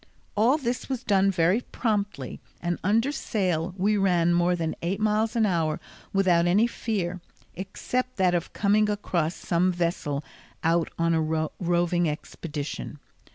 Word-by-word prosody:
All 235 +8 +4
this 250 -3 -3
was 260 -2 -2
done 195 -1 +3
very 185 +4 +2
promptly, 205 - -2 0.2
and 175 0 -2
under 225 +8 +2
sail 185 - -1
we 205 +3 +2
ran 175 -3 +3
more 175 +1 +3
than 165 -2 -2
eight 180 +4 -1
miles 215 +2 +1
an 225 -2 +3
hour 165 -5 0 0.3
without 180 -3 +3
any 200 +6 +4
fear, 195 -7 -2 0.3
except 250 +7 -3
that 185 -2 +3
of 175 -1 -1
coming 210 +1 +2
across 180 -5 -1
some 180 +1 +1
vessel 170 -5 -1 0.4
out 165 0 +2
on 165 0 +2
a 160 - +2 0.4
roving 175 -1 +1
expedition. 150 -1 -5
180 Hz, 145 wpm, -26 LUFS, 170-210 Hz, 0.4 s, All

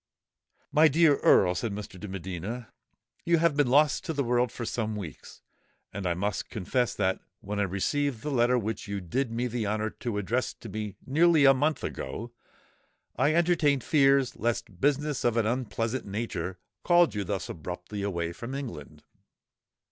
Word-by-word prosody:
"My 155 +2 +6
dear 155 -1 +4
Earl," 90 -1 +5
said 115 +4 -2
Mr. 100 -2 -7
de 105 - -7
Medina, 95 +5 -6 0.5
"you 170 0 +3
have 165 -2 +2
been 145 -2 +3
lost 145 +5 +4
to 165 - -2
the 140 -2 0
world 120 -1 +1
for 120 - -5
some 110 -1 -2
weeks; 85 -10 -9 0.5
and 95 -1 -3
I 85 - +1
must 100 +4 -2
confess 115 +5 -1
that 95 -2 0 0.2
when 105 +1 -4
I 100 -2 +1
received 130 +6 -1
the 150 - -2
letter 125 -1 +3
which 110 -2 -3
you 100 0 -3
did 115 +8 -2
me 120 +2 -1
the 120 -3 -2
honour 110 +1 -1
to 115 -4 -4
address 115 +6 -1
to 115 - -10
me 105 -1 -5
nearly 160 +1 +4
a 135 - +8
month 150 +4 0
ago, 110 - -5 0.8
I 155 +2 +2
entertained 165 -6 +3
fears 135 -3 +3
lest 110 -5 -3
business 145 0 +1
of 120 -1 +2
an 115 - +2
unpleasant 115 0 -2
nature 100 -4 -4 0.3
called 175 -1 +4
you 105 -1 -2
thus 95 0 -3
abruptly 90 +5 -6
away 85 -4 -2
from 120 +8 -6
England." 120 - -7
115 Hz, 170 wpm, -28 LUFS, 100-140 Hz, 0.8 s, a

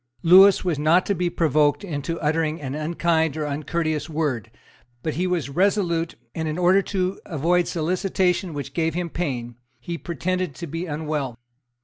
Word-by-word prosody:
Lewis 190 +3 +7
was 165 -5 0
not 165 +5 +4
to 200 - +1
be 180 -1 0
provoked 155 -1 +2
into 165 -2 -4
uttering 160 +1 0
an 135 -2 -5
unkind 160 0 0
or 155 - -2
uncourteous 155 +1 -2
word: 150 -9 -2 0.5
but 155 - -1
he 180 +4 -1
was 175 -5 -1
resolute 170 0 +1 0.2
and, 160 -1 -3
in 155 +1 -2
order 180 +2 +4
to 185 -1 -2
avoid 175 +2 +1
solicitation 180 +1 0
which 140 -1 -5
gave 165 -1 0
him 175 -2 -2
pain, 120 -8 -3 0.2
he 170 -1 -5
pretended 180 -2 -2
to 170 - -6
be 165 +3 -5
unwell. 150 -5 -3
165 Hz, 160 wpm, -23 LUFS, 150-180 Hz, 0.5 s, Lewis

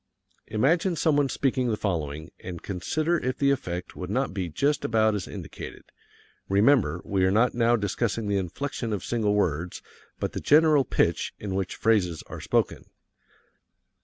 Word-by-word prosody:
Imagine 160 - +2
someone 145 -4 +2
speaking 130 -2 0
the 110 - 0
following, 80 -6 -3
and 90 -3 -8
consider 155 - -1
if 130 -2 -2
the 140 0 +3
effect 90 -10 -3
would 90 -1 -6
not 130 +1 0
be 95 -3 -3
just 140 - 0
about 110 -1 +2
as 100 -3 -3
indicated. - - -8 0.7
Remember, 100 - +3
we 95 -2 +1
are 95 - +4
not 115 +6 +3
now 120 0 +3
discussing 105 +1 -1
the 100 -1 +1
inflection 115 +5 -3
of 100 - -3
single 105 -3 +1
words, 85 -3 -1 0.4
but - - -2
the - - -3
general 150 -2 +5
pitch - - 0
in 100 -2 -5
which 95 -1 -2
phrases 95 -8 +1
are - - -8
spoken. - - 0
110 Hz, 160 wpm, -26 LUFS, 95-135 Hz, 0.7 s, general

